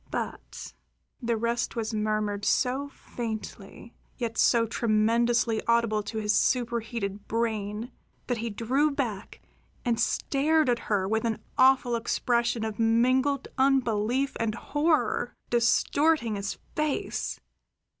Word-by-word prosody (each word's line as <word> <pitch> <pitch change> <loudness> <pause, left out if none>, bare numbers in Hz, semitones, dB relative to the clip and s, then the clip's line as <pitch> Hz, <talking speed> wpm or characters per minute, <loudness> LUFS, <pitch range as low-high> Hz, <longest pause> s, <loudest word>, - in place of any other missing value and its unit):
"But - - -6 0.2
" - - -46
The 235 -1 0
rest 235 +2 -1
was 225 -1 -2
murmured 210 -1 -1
so 265 +6 +1
faintly, 225 -3 -7 0.2
yet 235 -3 -3
so 230 0 +4
tremendously 230 +1 +2
audible 230 -2 +2
to 210 +2 -6
his 210 0 +1
superheated 230 -5 -1
brain, 220 0 -2 0.3
that 245 -2 -2
he 230 +1 -2
drew 255 +8 +1
back 235 -8 -4 0.4
and 235 -2 +1
stared 300 +1 +2
up - - +5
at 240 - 0
her 195 -3 0
with 220 +2 0
an 225 -2 0 0.2
awful 255 -2 +4
expression 235 0 0
of 220 -1 -5
mingled 255 +5 +2
unbelief 260 -1 +2
and 225 -2 -1
horror 300 +5 0 0.2
distorting 240 +2 +2
his 200 0 -4 0.2
face. 305 -2 -2
235 Hz, 125 wpm, -27 LUFS, 220-255 Hz, 0.4 s, up